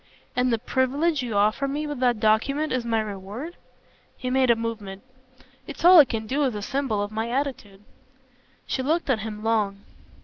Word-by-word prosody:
"And 250 Hz, 0 st, +2 dB
the 230 Hz, -, +2 dB
privilege 265 Hz, +6 st, 0 dB
you 235 Hz, -4 st, -4 dB
offer 215 Hz, +7 st, +2 dB
me 290 Hz, +2 st, -3 dB
with 295 Hz, -3 st, -5 dB
that 245 Hz, -3 st, +2 dB
document 270 Hz, +9 st, +1 dB
is 255 Hz, -2 st, -1 dB
my 225 Hz, -1 st, +1 dB
reward?" 210 Hz, -, -7 dB, 0.6 s
He 255 Hz, -, -4 dB
made 260 Hz, -1 st, +2 dB
a 235 Hz, -, +6 dB
movement. 220 Hz, -4 st, -5 dB, 0.6 s
"It's 300 Hz, +2 st, -5 dB
all 360 Hz, -1 st, +10 dB
I 295 Hz, -, +9 dB
can 225 Hz, -3 st, -4 dB
do 275 Hz, +6 st, 0 dB
as 255 Hz, -5 st, 0 dB
a 205 Hz, -, -5 dB
symbol 250 Hz, -5 st, -1 dB
of 205 Hz, -, -5 dB
my 220 Hz, +2 st, -3 dB
attitude." 240 Hz, -7 st, -4 dB, 0.8 s
She -, -, -2 dB
looked 310 Hz, +2 st, 0 dB
at 235 Hz, -, +1 dB
him 215 Hz, 0 st, -6 dB
long. 210 Hz, -3 st, 0 dB
240 Hz, 190 wpm, -25 LUFS, 215-275 Hz, 0.8 s, all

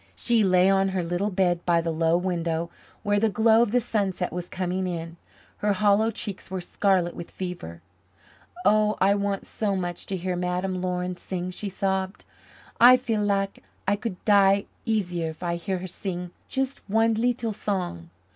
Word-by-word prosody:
She 235 Hz, -3 st, +3 dB
lay 185 Hz, -1 st, +4 dB
on 195 Hz, 0 st, +3 dB
her 190 Hz, -2 st, -1 dB
little 175 Hz, +4 st, -1 dB
bed 180 Hz, -3 st, +1 dB
by 170 Hz, -1 st, +3 dB
the 165 Hz, 0 st, -1 dB
low 165 Hz, +1 st, +2 dB
window, 170 Hz, -2 st, -2 dB, 0.3 s
where 205 Hz, -1 st, +2 dB
the 220 Hz, +1 st, +3 dB
glow 220 Hz, +3 st, +4 dB
of 235 Hz, -, +3 dB
the 245 Hz, +4 st, +3 dB
sunset 195 Hz, -6 st, -1 dB
was 175 Hz, 0 st, -5 dB
coming 185 Hz, 0 st, -2 dB
in; 165 Hz, -1 st, -5 dB, 0.4 s
her 205 Hz, 0 st, +1 dB
hollow 205 Hz, +3 st, +3 dB
cheeks 205 Hz, -4 st, -5 dB
were 190 Hz, 0 st, -3 dB
scarlet 180 Hz, -1 st, +1 dB
with 170 Hz, -, -7 dB
fever. 170 Hz, -, -7 dB, 0.8 s
"Oh! 215 Hz, 0 st, +4 dB
I 195 Hz, +2 st, +4 dB
want 200 Hz, -1 st, -1 dB
so 205 Hz, -3 st, -2 dB
much 175 Hz, -2 st, -4 dB
to 195 Hz, -, -2 dB
hear 180 Hz, 0 st, -2 dB
Madame 180 Hz, +1 st, -2 dB
Laurin 180 Hz, 0 st, -2 dB
sing," 180 Hz, 0 st, -4 dB
she 200 Hz, +2 st, -4 dB
sobbed. 190 Hz, 0 st, -2 dB, 0.5 s
"I 250 Hz, +2 st, +9 dB
feel 230 Hz, -4 st, -1 dB
lak 200 Hz, -1 st, 0 dB, 0.3 s
I 200 Hz, -, +3 dB
could 210 Hz, -2 st, -5 dB
die 200 Hz, -1 st, +5 dB, 0.2 s
easier 180 Hz, -7 st, -1 dB
if 160 Hz, +3 st, -9 dB
I 170 Hz, -1 st, -1 dB
hear 190 Hz, +2 st, -2 dB
her 180 Hz, -, -6 dB
sing 180 Hz, -1 st, -5 dB, 0.2 s
just 270 Hz, 0 st, -2 dB
one 225 Hz, +2 st, +3 dB
leetle 230 Hz, 0 st, 0 dB
song. 180 Hz, -, -3 dB
190 Hz, 175 wpm, -25 LUFS, 180-205 Hz, 0.8 s, I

